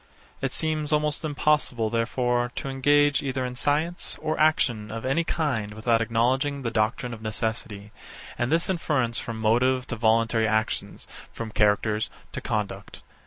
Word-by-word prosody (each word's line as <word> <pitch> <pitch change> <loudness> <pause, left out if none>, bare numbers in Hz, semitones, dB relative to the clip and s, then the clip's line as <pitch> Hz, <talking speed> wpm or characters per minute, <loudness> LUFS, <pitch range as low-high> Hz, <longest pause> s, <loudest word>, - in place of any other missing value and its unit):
It 135 - -1
seems 155 -1 -2
almost 150 0 +1
impossible, 145 -7 +1
therefore, 120 +1 0
to 135 - -4
engage 145 +2 +3
either 130 -2 -2
in 125 0 -5
science 155 +7 0
or 155 0 -1
action 120 -9 +2
of 115 +2 -5
any 135 +6 +1
kind 130 -11 -1
without 115 +1 +2
acknowledging 130 +5 +1
the 115 - -1
doctrine 115 +3 0
of 110 - -9
necessity, 110 -1 -3 0.4
and 120 +2 -1
this 165 +1 +3
inference 145 -10 0
from 115 -1 -5
motive 125 +4 +2
to 120 - -4
voluntary 115 0 +2
actions, 110 +1 -1 0.3
from 115 -1 -6
characters 105 0 +2 0.2
to - - -5
conduct. 100 -2 -4
120 Hz, 150 wpm, -26 LUFS, 110-145 Hz, 0.4 s, engage